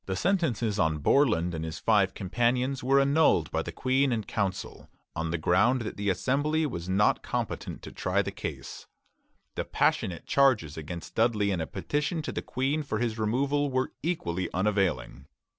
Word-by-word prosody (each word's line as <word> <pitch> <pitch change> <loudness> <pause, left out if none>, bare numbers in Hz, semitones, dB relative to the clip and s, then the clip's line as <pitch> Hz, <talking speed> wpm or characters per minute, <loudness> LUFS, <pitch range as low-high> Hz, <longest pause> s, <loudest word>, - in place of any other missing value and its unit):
The 95 - -1
sentences 125 - 0
on 80 -1 +2
Borland 90 - +2
and 80 -1 -4
his 80 -1 -5
five - - +2
companions 125 +7 0
were 135 +2 +4
annulled 140 - +3
by - - 0
the - - -6
Queen 130 +1 +1
and 110 -3 -2
Council, 100 -3 -3 0.3
on 80 +1 -2
the 85 - -1
ground 100 +10 +3
that 110 - -5
the 100 0 -1
Assembly 145 - +1
was 85 - -5
not 100 +3 +3
competent - - -4
to - - -8
try - - 0
the - - -4
case. - - -7 0.7
The - - -2
passionate 90 -3 0
charges 125 - +3
against 80 +2 -7
Dudley 110 -3 +2
and 90 -4 -1
a 80 - -3
petition 150 +3 -2
to - - -4
the - - -3
Queen 135 +5 -1
for 140 -7 -3
his 115 -1 -2
removal 140 +6 +1
were 130 0 -1
equally 95 - -2
unavailing. 90 -10 0
110 Hz, 175 wpm, -28 LUFS, 90-135 Hz, 0.7 s, were